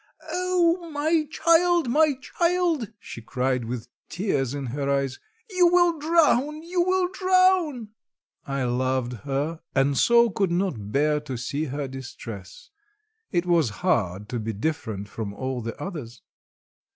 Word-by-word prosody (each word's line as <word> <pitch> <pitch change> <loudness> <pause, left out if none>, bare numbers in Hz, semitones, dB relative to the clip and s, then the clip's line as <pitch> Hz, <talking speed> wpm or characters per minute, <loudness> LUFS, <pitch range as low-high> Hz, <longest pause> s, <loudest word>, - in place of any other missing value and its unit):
"Oh, 355 -1 +1
my 310 +1 +1
child! 335 0 +3
my 295 +3 +3
child!" 340 - 0
she 115 - -9
cried, 125 +1 -1
with 120 0 -5 0.2
tears 145 - -1
in 140 -1 -4
her 140 -1 -2
eyes. 140 -2 0 0.3
"You 365 -2 +5
will 350 -2 +4
drown! 305 -2 +2
You 350 +1 0
will 370 +1 +2
drown!" 370 - +2 0.5
I 135 -1 -2
loved 125 0 0
her, 145 +4 -2 0.2
and 135 +1 +3
so 235 - +5
could 195 -1 0
not 170 - -2
bear 150 +3 +2
to 140 -4 -6
see 140 +6 -2
her 140 0 -4
distress. 135 - -9 0.6
It 175 0 +1
was 170 -7 +3 0.2
hard 100 -1 +1
to 120 - -2
be 110 0 -3
different 110 -4 -3
from 105 -1 -6
all 130 +2 -3
the 115 0 -6
others. 150 - -7
165 Hz, 140 wpm, -25 LUFS, -, 0.6 s, You